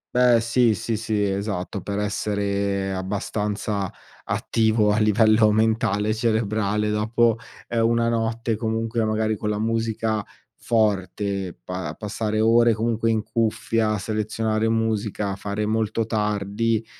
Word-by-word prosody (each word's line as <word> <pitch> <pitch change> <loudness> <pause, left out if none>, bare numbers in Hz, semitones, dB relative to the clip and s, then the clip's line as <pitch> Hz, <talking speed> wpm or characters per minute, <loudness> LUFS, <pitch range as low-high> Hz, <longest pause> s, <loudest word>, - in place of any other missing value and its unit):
Beh, 125 -2 +5
sì, 115 0 +3
sì, 110 +3 -2
sì. 110 -2 -1
Esatto, 100 -1 -2
per 100 +2 -4
essere 100 -1 -1
abbastanza 100 +1 -2 0.4
attivo 110 -2 +1
a 105 - +1
livello 110 0 +4
mentale, 110 -1 +1
cerebrale 110 -2 0
dopo, 110 +2 +2 0.3
ehm, 115 -1 +2
una 115 0 +2
notte 115 0 -1
comunque 115 0 -1
magari 110 0 0
con 105 - -4
la 105 - -1
musica 110 0 -1 0.4
forte, 100 -3 -1
pa 90 +6 -5
passare 110 0 -2
ore 115 +1 +5
comunque 115 +1 0
in 110 -2 +1
cuffia, 115 -1 0
a 105 - 0
selezionare 110 +1 -1
musica, 110 -3 -1
fare 100 +1 -3
molto 110 +1 0
tardi, 105 +1 -1
110 Hz, 125 wpm, -23 LUFS, 105-115 Hz, 0.4 s, Beh